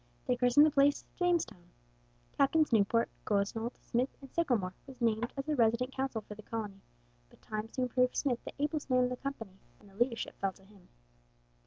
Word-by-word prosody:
They 250 - +2
christened 250 +4 +6
the 310 - +3
place 285 0 +3
Jamestown. 345 - 0 0.7
Captains 300 0 +3
Newport, 225 +2 +3 0.2
Gosnold, 215 +3 -1
Smith, 250 +3 -1
and 270 -2 -13
Sickelmore 235 - +1
were 270 - -10
named 230 0 +1
as 275 - -2
the 305 - 0
resident 235 +1 +2
council 265 -4 -2
for 210 - -9
the 210 - -11
colony, 210 -3 -5 0.5
but - - -21
time 215 0 -4
soon 255 -1 -1
proved 250 +1 +2
Smith 250 -4 0
the - - -7
ablest 295 0 -2
man 255 -1 +4
in 250 - +1
the 250 - -2
company, 225 -8 -6 0.2
and - - -19
the 195 - -18
leadership 235 +2 0
fell 195 -1 0
to 190 - -21
him. 195 -2 -20
245 Hz, 190 wpm, -32 LUFS, 215-275 Hz, 0.7 s, christened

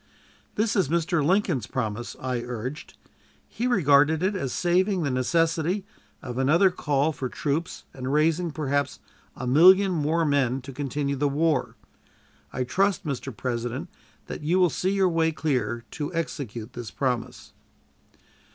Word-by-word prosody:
"This 215 +1 +1
is 185 -8 +2
Mr. 170 -1 +1
Lincoln's 175 - +1
promise," 115 -1 -3
I 125 -2 -2
urged. 125 +4 -6 0.5
"He 240 +3 -3
regarded 155 - +4
it 195 +2 +1
as 135 -9 -2
saving 185 +1 +1
the 140 - 0
necessity 165 +8 +1 0.4
of 125 -2 -5
another 170 +8 +4
call 150 -3 0
for 130 -4 -4
troops 150 +5 -3
and 130 0 -4
raising, 160 +4 +2
perhaps, 140 -3 -1 0.4
a 130 - -6
million 185 +9 +6
more 165 0 +1
men 135 -3 +1
to 135 +1 -9
continue 140 +1 -2
the 145 +1 +1
war. 150 -1 0 0.8
I 130 - -2
trust, 195 +8 0
Mr. 135 -2 -3
President, 125 +6 -3 0.4
that - - -7
you 165 +5 +1
will 180 -3 +4
see 185 - -1
your 195 -1 +3
way 165 -2 +2
clear 120 -7 -2
to 145 +1 -4
execute 125 -8 -4
this 120 -3 -6
promise." 125 -4 -3
150 Hz, 145 wpm, -25 LUFS, 130-170 Hz, 0.8 s, million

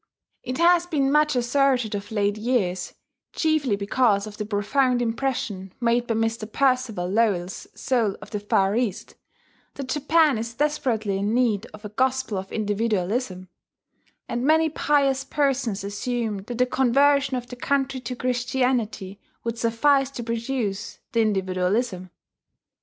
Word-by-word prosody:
It 255 - -4
has 345 +1 +4
been 275 -5 +1
much 300 -1 +3
asserted 250 -2 +2
of 205 +1 -5
late 205 -1 +1
years 215 -6 -1 0.4
(chiefly 310 -8 +1
because 200 0 +1
of 210 -1 -9
the 210 - -4
profound 245 +5 +1
impression 225 -6 -2
made 240 0 +1
by 230 - 0
Mr. 225 -1 -1
Percival 255 -9 +1
Lowell's 190 -3 0
Soul 230 -6 0
of - - -12
the 210 - -2
Far 200 -1 +1
East) 230 -6 -2 0.6
that 275 -2 -6
Japan 295 -2 +3
is 230 +1 -5
desperately 235 -9 0
in 205 +3 0
need 235 -3 +1
of 210 0 -13
a - - -5
Gospel 255 -2 0
of 190 +1 -9
Individualism; 205 -2 -1 0.8
and 240 +1 -2
many 315 +3 +4
pious 280 -3 +1
persons 270 -7 0
assume 220 +2 -2
that 240 +1 -5
the 250 - +4
conversion 270 +2 +3
of 245 - -5
the 250 - -9
country 270 +1 -1
to 250 0 -5
Christianity 245 -5 -1 0.2
would 230 0 -3
suffice 270 +4 +3
to 250 -3 -6
produce 230 -3 -3
the 230 - +2
Individualism. 190 0 0
235 Hz, 140 wpm, -24 LUFS, 205-265 Hz, 0.8 s, has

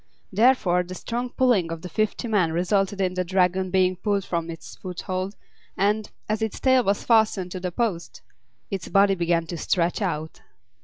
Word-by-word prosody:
Therefore 205 -5 +4
the 180 +1 -7
strong 240 +6 -3
pulling 235 -10 +2
of 165 -1 -6
the - - -4
fifty 215 +6 -1
men 195 -7 +2
resulted 195 +3 0
in 185 -2 +1
the 185 0 -1
Dragon 185 +1 +1
being 185 0 +2
pulled 200 0 -1
from 170 -1 -2
its 165 -1 -9
foothold, 185 +1 -4 0.4
and, 210 +2 +1 0.2
as 215 +1 -1
its 220 -2 -2
tail 260 -1 +4
was 200 -1 0
fastened 220 -5 +2
to 185 - -4
the 180 0 -3
post, 190 -4 -3 0.5
its 195 -3 -4
body 195 0 +4
began 170 -2 +1
to 170 +1 -6
stretch 175 +5 0
out. 160 -5 -3
190 Hz, 175 wpm, -24 LUFS, 175-210 Hz, 0.5 s, Therefore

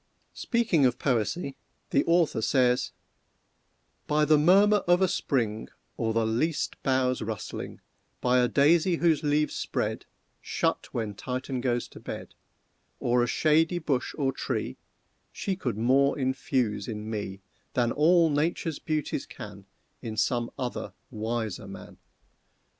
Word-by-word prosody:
Speaking 230 - +1
of 125 - -1
Poesy 135 - -1 0.3
the 140 - +3
author 165 -8 +2
says: 125 +1 +2 1.2
"By 150 0 +3
the 155 -1 +5
murmur 200 +6 +6
of 175 0 +5
a 190 - +4
spring, 115 -10 -1 0.3
Or 115 -1 -1
the 115 0 +1
least 125 +9 -1
boughs 130 -2 +1
rustleling, 110 -2 -5 0.4
By 125 0 +3
a 125 - +4
daisy 165 +7 +4
whose 165 -2 +2
leaves 150 0 +1
spread, - - -2 0.3
Shut - - -1
when 110 -3 -3
Titan 130 +4 -4
goes 120 -2 0
to - - -12
bed, - - -7 0.7
Or 120 0 +2
a 120 - +1
shady 160 +6 +2
bush 140 -6 -1
or 135 -3 +1
tree, - - -3 0.5
She 195 - -2
could 125 - -3
more 135 +5 +3
infuse 130 -4 -1
in 105 -2 -5
me 100 -3 -5 0.3
Than 120 -2 +2
all 165 +3 +4
Nature's 155 +1 -1
beauties 155 -3 -2
can 105 -4 -10 0.3
In 110 -3 -6
some 120 0 +1
other 125 -1 -4 0.2
wiser 110 -2 -3
man. - - -11
130 Hz, 135 wpm, -27 LUFS, 115-155 Hz, 1.2 s, murmur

